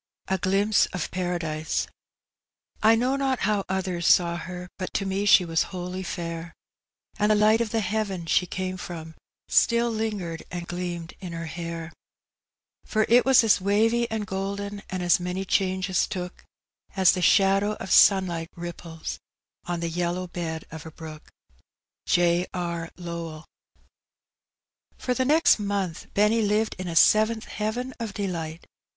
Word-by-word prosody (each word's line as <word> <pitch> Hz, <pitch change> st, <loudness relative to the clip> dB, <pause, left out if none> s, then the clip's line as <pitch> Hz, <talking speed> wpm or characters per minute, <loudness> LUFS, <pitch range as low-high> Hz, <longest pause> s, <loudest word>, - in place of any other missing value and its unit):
A 190 Hz, 0 st, +1 dB
GLIMPSE 200 Hz, +4 st, +2 dB
OP 180 Hz, -, -3 dB
PARADISE, 170 Hz, -4 st, -2 dB, 1.0 s
I 220 Hz, +1 st, +6 dB
know 250 Hz, +4 st, +1 dB
not 270 Hz, -2 st, 0 dB
how 205 Hz, 0 st, +1 dB
others 185 Hz, -2 st, -1 dB
saw 170 Hz, -1 st, +4 dB
her, 180 Hz, 0 st, -7 dB
But 185 Hz, -, -5 dB
to 195 Hz, -, 0 dB
me 195 Hz, +1 st, -1 dB
she 185 Hz, -2 st, +7 dB
was 165 Hz, -1 st, +1 dB
wholly 180 Hz, 0 st, -5 dB
fair; 170 Hz, -2 st, -5 dB, 0.6 s
And 210 Hz, 0 st, +3 dB
the 215 Hz, -, +5 dB
light 215 Hz, +2 st, +4 dB
of 230 Hz, -, -1 dB
the 225 Hz, +1 st, 0 dB
heaven 195 Hz, -3 st, -2 dB
she 180 Hz, +2 st, +2 dB
came 185 Hz, +1 st, -4 dB
from 160 Hz, -3 st, -7 dB, 0.3 s
Still 235 Hz, 0 st, +3 dB
lingered 210 Hz, -7 st, -3 dB
and 175 Hz, -1 st, -6 dB
gleamed 175 Hz, -1 st, -5 dB
in 180 Hz, -3 st, -7 dB
her 165 Hz, 0 st, -5 dB
hair; 165 Hz, 0 st, -6 dB, 0.9 s
For 215 Hz, -1 st, +1 dB
it 245 Hz, +2 st, +6 dB
was 265 Hz, -2 st, +6 dB
as 215 Hz, -3 st, +4 dB
wavy 225 Hz, +4 st, +2 dB
and 220 Hz, -1 st, -2 dB
golden, 200 Hz, +1 st, -4 dB
And 185 Hz, -1 st, -3 dB
as 175 Hz, 0 st, +4 dB
many 180 Hz, +2 st, -3 dB
changes 185 Hz, -1 st, +1 dB
took, 180 Hz, -1 st, -6 dB, 0.5 s
As 190 Hz, -2 st, +6 dB
the 185 Hz, -, -2 dB
shadow 195 Hz, +3 st, +4 dB
of 190 Hz, -, -7 dB
sunlight 175 Hz, -4 st, +4 dB
ripples 170 Hz, -1 st, -7 dB, 0.5 s
On 175 Hz, -1 st, -3 dB
the 170 Hz, -, -1 dB
yellow 175 Hz, +2 st, -2 dB
bed 165 Hz, -3 st, -5 dB
of 160 Hz, -1 st, -8 dB
a 160 Hz, -, -8 dB
brook. 155 Hz, -1 st, -10 dB, 0.8 s
J. 175 Hz, +1 st, +3 dB
R. 170 Hz, -2 st, -3 dB
Lowell. 170 Hz, -3 st, -6 dB, 1.5 s
For 250 Hz, -, -1 dB
the 255 Hz, +1 st, 0 dB
next 310 Hz, -2 st, +4 dB
montli 200 Hz, -5 st, -3 dB
Benny 210 Hz, +3 st, +3 dB
lived 215 Hz, +1 st, +1 dB
in 185 Hz, -, -4 dB
a 170 Hz, -, -4 dB
seventh 220 Hz, +5 st, +4 dB
heaven 240 Hz, +5 st, -3 dB
of 225 Hz, -3 st, -5 dB
delight. 170 Hz, -5 st, -4 dB
185 Hz, 155 wpm, -25 LUFS, 170-210 Hz, 1.5 s, she